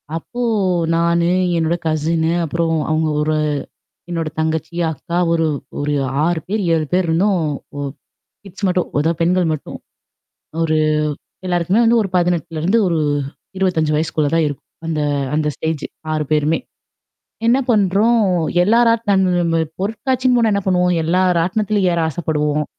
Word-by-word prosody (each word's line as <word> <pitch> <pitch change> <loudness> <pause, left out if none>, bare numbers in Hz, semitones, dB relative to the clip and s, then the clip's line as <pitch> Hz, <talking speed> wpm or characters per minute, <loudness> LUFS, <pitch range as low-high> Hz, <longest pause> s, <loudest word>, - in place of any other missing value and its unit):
அப்போ 240 +9 -6 0.5
நானு, 170 0 +2 0.3
என்னோட 165 +1 +1
கசின்னு, 160 +1 0
அப்புறம் 165 +1 -1 0.2
அவங்க 155 0 +1
ஒரு 155 +1 0 0.7
என்னோட 165 -2 -2
தங்கச்சி, 160 +1 -2 0.2
அக்கா 170 +3 -5
ஒரு 165 -1 +2 0.3
ஒரு 145 +1 -1 0.3
6 170 -1 +1
பேர், 210 +3 -1
7 160 -1 +1
பேர் 180 0 +2
இருந்தோம். 185 +4 +2 0.4
ஒ - - -4 0.6
கிட்ஸ் 200 +1 -6
மட்டும். 180 -1 0
அதான் 160 +2 0
பெண்கள் 180 +2 +2
மட்டும். 155 - -7 0.9
ஒரு 160 -1 +1 0.7
எல்லாருக்குமே 180 +4 +1
வந்து 230 0 +4
ஒரு 200 - -3
18லருந்து 175 +2 +1
ஒரு 165 -2 0 0.6
25 165 -5 +1
வயசுக்குள்ள 155 -1 0
தான் 165 -1 +3
இருக்கும். 145 - -9 0.2
அந்த 160 -2 -1 0.3
அந்த 150 0 +1
ஸ்டேஜ் 160 -2 -3 0.3
6 155 -1 0
பேருமே. 155 +1 +2 0.9
என்ன 240 +3 +5
பண்றோம் 210 +3 +3 0.4
எல்லா 220 +5 +4
ராட்னம் 190 -7 +2 0.2
பொருட்காட்சின்னு 250 +5 0
போனா 230 -2 +3
என்ன 200 - 0
பண்ணுவோம்? 180 -1 +2
எல்லா 175 +3 +2 0.2
ராட்டனத்திலயும் 195 +2 +1
ஏற 170 - 0
ஆசைப்படுவோம். 150 -2 -1
170 Hz, 130 wpm, -18 LUFS, 160-195 Hz, 0.9 s, என்ன